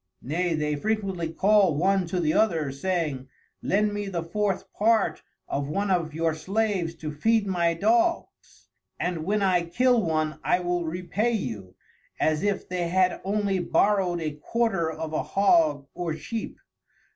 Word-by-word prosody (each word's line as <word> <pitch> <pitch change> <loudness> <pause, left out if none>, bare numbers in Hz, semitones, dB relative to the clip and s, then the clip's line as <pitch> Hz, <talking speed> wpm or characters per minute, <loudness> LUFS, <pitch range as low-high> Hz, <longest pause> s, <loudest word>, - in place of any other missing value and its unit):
Nay 170 +5 0
they 150 -1 -1
frequently 195 -2 -2
call 195 -2 +3
one 190 +2 +2
to 180 +2 -2
the 155 -2 +1
other, 165 -10 +2
saying, 150 -3 -2 0.3
lend 210 +1 +1
me 205 -1 -3
the 175 -4 -3
fourth 195 +2 -2
part 215 -6 +2 0.3
of 140 0 -2
one 200 +5 -1
of 165 -4 0
your 165 0 +1
Slaves 190 0 -1
to 155 -2 -6
feed 220 +8 +2
my 170 -3 +1
Dogs, 345 - 0 0.3
and 175 -3 -2
when 205 +2 +1
I 185 -2 +3
kill 245 +8 +2
one, 155 -3 -1
I 180 - +2
will 175 -1 -1
repay 180 +8 -1
you, 110 - -4 0.4
as 155 -1 +1
if 205 -1 -1
they 180 -1 -2
had 185 +1 +1
only 200 -1 0
borrowed 185 -1 +1
a 155 -1 -2
quarter 190 +2 -1
of 160 0 -6
a - - 0
Hog 160 -8 +2
or 170 -3 -3
Sheep. 225 +7 -5
180 Hz, 155 wpm, -26 LUFS, 160-205 Hz, 0.4 s, call